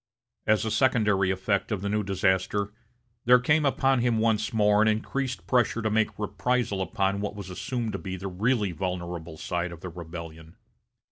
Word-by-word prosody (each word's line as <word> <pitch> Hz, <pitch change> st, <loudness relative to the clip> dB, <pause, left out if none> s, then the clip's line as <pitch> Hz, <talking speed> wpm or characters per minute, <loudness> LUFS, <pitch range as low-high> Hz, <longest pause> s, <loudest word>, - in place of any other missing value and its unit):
As 110 Hz, 0 st, +3 dB
a 110 Hz, -, -1 dB
secondary 105 Hz, -8 st, +3 dB
effect 95 Hz, +3 st, 0 dB
of 105 Hz, -3 st, -1 dB
the -, -, -1 dB
new 105 Hz, +1 st, +1 dB
disaster, 100 Hz, +1 st, 0 dB, 0.5 s
there 125 Hz, +1 st, +8 dB
came 150 Hz, +4 st, +2 dB
upon 135 Hz, -1 st, +2 dB
him 120 Hz, -1 st, +2 dB
once 110 Hz, -1 st, +1 dB
more 105 Hz, -1 st, +4 dB
an 110 Hz, -, +4 dB
increased 125 Hz, +4 st, -1 dB
pressure 120 Hz, -2 st, +1 dB
to 110 Hz, -, 0 dB
make 110 Hz, 0 st, +1 dB
reprisal 110 Hz, -1 st, -1 dB
upon 95 Hz, +2 st, 0 dB
what 105 Hz, 0 st, -3 dB
was 100 Hz, -2 st, -7 dB
assumed 110 Hz, +5 st, -3 dB
to -, -, -3 dB
be 95 Hz, -2 st, -5 dB
the 95 Hz, +2 st, -5 dB
really 105 Hz, +2 st, 0 dB
vulnerable 85 Hz, -2 st, -4 dB
side 85 Hz, +1 st, -2 dB
of 85 Hz, -1 st, -10 dB
the 90 Hz, -, -5 dB
rebellion. 80 Hz, -1 st, -9 dB
105 Hz, 180 wpm, -27 LUFS, 95-115 Hz, 0.5 s, there